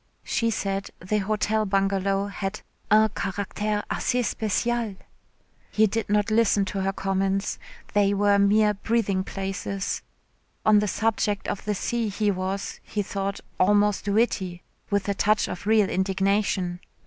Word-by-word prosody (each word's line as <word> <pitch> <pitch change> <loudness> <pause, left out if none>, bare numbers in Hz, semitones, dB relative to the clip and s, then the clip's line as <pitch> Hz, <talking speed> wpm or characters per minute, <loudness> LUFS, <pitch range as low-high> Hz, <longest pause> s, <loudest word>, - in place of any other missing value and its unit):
She 230 - 0
said 195 -2 -2
the 210 +4 -1
Hotel 215 +2 0
Bungalow 195 0 +1
had 200 0 -4 0.3
"un 215 +1 +6
caractère 205 +1 -2
assez 250 0 0
spècial...." 225 -1 -1 0.7
He 220 - +3
did 220 +1 -2
not 210 +1 +2
listen 215 -2 +3
to 195 0 -3
her 195 0 +1
comments 195 +1 -1 0.3
they 205 -1 +3
were 200 0 +3
mere 210 +1 +4
breathing 205 -2 0
places. 195 0 -3 0.6
On 215 -1 +6
the 210 - 0
subject 210 -1 0
of 200 - -3
the 210 0 0
sea 230 +3 -1
he 205 +1 +1
was, 190 +1 -3
he 210 - -3
thought, 195 0 -3 0.2
almost 205 +1 +3
witty, 200 -4 0 0.3
with 200 -1 0
a 200 - +1
touch 215 +2 +2
of 180 - -6
real 215 -2 +4
indignation. 190 -1 0
200 Hz, 140 wpm, -25 LUFS, 195-215 Hz, 0.7 s, un